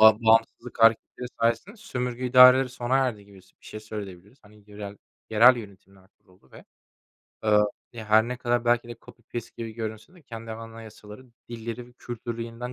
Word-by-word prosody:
ba 110 0 +9
bağımsızlık 115 +2 +1
hareketleri 115 +2 +2
sayesinde 115 - 0
sömürge 125 - -4
idareleri 125 +1 +7
sona 125 +1 -1
erdi 125 -6 -1
gibi 100 -2 -17
s 95 - -25
bir - - -16
şey 110 - -8
söyleyebiliriz. 105 +1 -9
Hani, 105 0 -20
yörel 105 -1 -9 0.3
yerel 120 +4 +7
yönetimler 100 -3 -13
kuruldu 90 -8 -27
ve, - - -14 0.8
aaa, 105 -1 +4 0.3
ya, 115 -2 -8
her 110 +2 +4
ne 125 - -4
kadar 120 -1 -1
belki 120 0 +1
de 120 - -8
copy 120 - -17
paste 120 -1 -5
gibi 115 -1 -6
görünse 110 - -7
de 175 - -19
kendi 115 -4 -9
anayasaları, 115 +1 -11 0.2
dilleri 120 +1 -7
ve 125 - -20
kültürü 120 -1 -6
yeniden 115 +2 -7
115 Hz, 175 wpm, -26 LUFS, 105-120 Hz, 0.8 s, ba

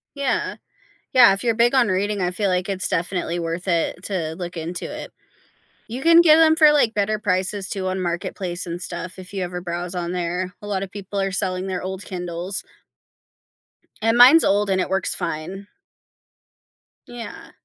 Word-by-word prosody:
Yeah. 280 -2 -1 0.6
Yeah, 245 -5 +8
if 195 - -4
you're 230 -2 +1
big 235 +2 +3
on 255 -4 +4
reading, 200 +2 0
I 180 0 0
feel, 195 +1 -1
like, 180 +1 -1
it's 190 -1 -2
definitely 175 -1 -1
worth 170 +2 -4
it 175 0 0
to 165 -6 -3
look 175 0 -6
into 170 +2 -5
it. - - -7 0.8
You 240 +4 -6
can 335 +3 +7
get 315 -2 +7
'em 320 -1 +5
for, 310 -2 +7
like, 280 -7 +3
better 210 0 0
prices, 190 -1 -1
too 190 -3 -3
on 185 0 -2
Marketplace 175 +1 -3
and 170 +1 -5
stuff 180 +1 -6
if 185 +1 -11
you 195 -2 -2
ever 180 0 -4
browse 175 0 -5
on 175 -1 -3
there; 180 +1 -2
a 205 - -8
lotta 195 -1 -2
people 200 +1 -6
are 195 0 0
selling 185 -1 -1
their 185 -1 -3
old 190 +1 -6
Kindles. 180 +1 -4 1.4
And 225 +2 +2
mine's 260 +7 +8
old, 200 0 +2
and 190 -1 +2
it - - -3
works 190 0 0
fine. 175 +3 -5 1.4
Yeah. 240 -1 -9
190 Hz, 180 wpm, -22 LUFS, 180-210 Hz, 1.4 s, Yeah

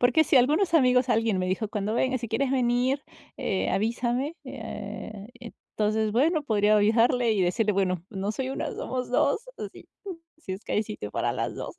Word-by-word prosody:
Porque 245 +6 +4
si 285 - +3
algunos 305 +8 +3
amigos 255 -4 +4
alguien 225 -4 +2
me 185 - -1
dijo: 190 +4 -1
"Cuando 210 +1 -2
vengas 255 0 +1
si 235 - -5
quieres 255 +4 0
venir, 255 +1 +1 0.4
eh, 190 - -1
avísame", 240 - -1
eh, 210 0 -7
entonces, 215 -2 -2
bueno, 305 +6 +2
podría 215 -4 +3
ayudarle, 230 +3 +3
y 205 - 0
decirle: 210 +4 +1
"Bueno, 185 -3 0
no 195 -1 -3
soy 260 +4 -3
1, 270 - -3
somos 255 -1 -4
2," 430 - +2 0.2
así, - - -8 0.5
si 315 -12 -7
es 190 +3 -6
que - - -5
hay 210 - +2
sitio 210 - -7
para - - -1
las - - -3
2. - - -6
230 Hz, 185 wpm, -26 LUFS, 210-255 Hz, 0.5 s, Porque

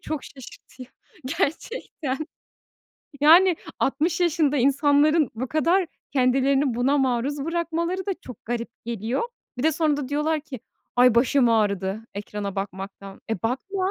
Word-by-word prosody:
çok 310 -3 -5
şaşırtıyor 260 -1 -12 0.5
gerçekten. 310 - -2 1.0
Yani, 340 +4 +7 0.2
60 330 +5 0
yaşında 315 -4 +2
insanların 285 +3 +3
bu 250 +3 -4
kadar 340 +4 +2 0.3
kendilerini 270 0 +2
buna 270 +4 +2
maruz 270 +2 0
bırakmaları 340 +3 -2
da 390 - 0
çok 250 - -12
garip 235 0 -3 0.2
geliyor. 235 +2 -2 0.4
Bir 250 - -2
de 320 0 +3
sonra 310 -1 +1
da 285 -3 -4
diyorlar 300 +2 0
ki, 275 -6 -9 0.4
"Ay, 250 -1 +6
başım 250 +1 +4
ağrıdı 200 -2 +1
ekrana 200 -1 -5
bakmaktan." 195 0 -6
E, 220 - -2
bakma. 370 - -1
275 Hz, 130 wpm, -24 LUFS, 235-315 Hz, 1.0 s, Yani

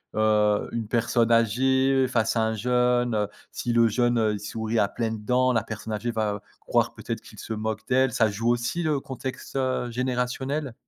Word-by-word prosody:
heu, 105 -1 +2
une 115 -2 -3
personne 120 0 +1
âgée 130 +4 +3
face 115 -2 +1
à 115 - +2
un 110 0 0
jeune, 125 +1 +1
heu, 105 -1 +1 0.2
si 120 -1 -2
le 115 -1 +5
jeune, 120 +2 +1
heu, 110 -2 +2
il 105 - -4
sourit 110 +2 -2
à 100 - +3
pleines 110 -2 -3
dents, 125 +3 +2
la 115 -3 +1
personne 110 0 -6
âgée 105 +3 -2
va 110 -3 -1 0.2
croire - - +1
peut-être - - -5
qu'il - - -15
se 115 - -5
moque 110 0 -3
d'elle, 130 -1 +3
ça 115 -2 +3
joue 115 +4 -1
aussi 120 +8 0
le 155 -4 +1
contexte, 130 -1 -7
heu, 130 -2 -1
générationnel? 125 +2 -2
115 Hz, 195 wpm, -25 LUFS, 110-125 Hz, 0.2 s, le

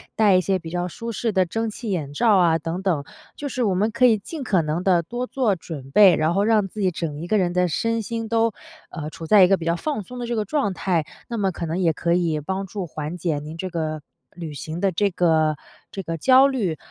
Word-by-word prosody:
戴 210 -3 +4
一 - - +3
些 190 +1 0
比 165 -3 -9
较 175 +1 -2
舒 230 +6 -6
适 225 +1 -2
的 190 -1 +3
蒸 225 +6 -2
汽 215 0 -6
眼 150 -6 -3
罩 210 +5 +4
啊， 170 -3 +4
等 165 +3 -4
等。 175 -7 0 0.3
就 285 -1 -5
是 250 0 -2
我 200 -5 +1
们 210 +4 +1
可 235 +3 +3
以 225 -3 +5
尽 305 +9 -8
可 190 -7 +2
能 155 +3 -2
地 180 -3 +3
多 240 +8 -4
做 240 -8 +1
准 145 -5 -9
备， 195 +3 +7
然 155 +2 +1
后 200 +3 +2
让 215 -2 +3
自 215 - -9
己 190 -2 +2
整 160 -4 -4
一 170 - -6
个 215 - +2
人 180 -2 +1
的 180 0 +2
身 230 +8 -1
心 225 +1 -4
都， 230 -1 +2 0.4
呃， 155 -3 -5
处 160 +1 -9
在 200 +1 +7
一 180 - +5
个 195 - +4
比 165 - -7
较 170 0 +1
放 250 - -3
松 250 +6 -10
的 240 - -3
这 235 - -2
个 215 - 0
状 205 -5 0
态， 175 -4 0 0.2
那 235 -2 -4
么 195 -2 +1
可 170 - -5
能 165 +3 -2
也 170 -3 +3
可 170 +2 0
以 170 -3 +1
帮 190 +6 -3
助 195 - -12
缓 155 +3 -5
解 165 -4 -1
您 155 +2 -8
这 185 +2 -4
个 155 -2 -3 0.3
旅 165 -3 -7
行 155 +4 -6
的 195 +1 +1
这 200 +4 +1
个 160 -4 +2 0.4
这 195 - -5
个 165 -1 -4
焦 260 - +6
虑。 210 - -1
185 Hz, 280 characters per minute, -23 LUFS, 165-215 Hz, 0.4 s, 备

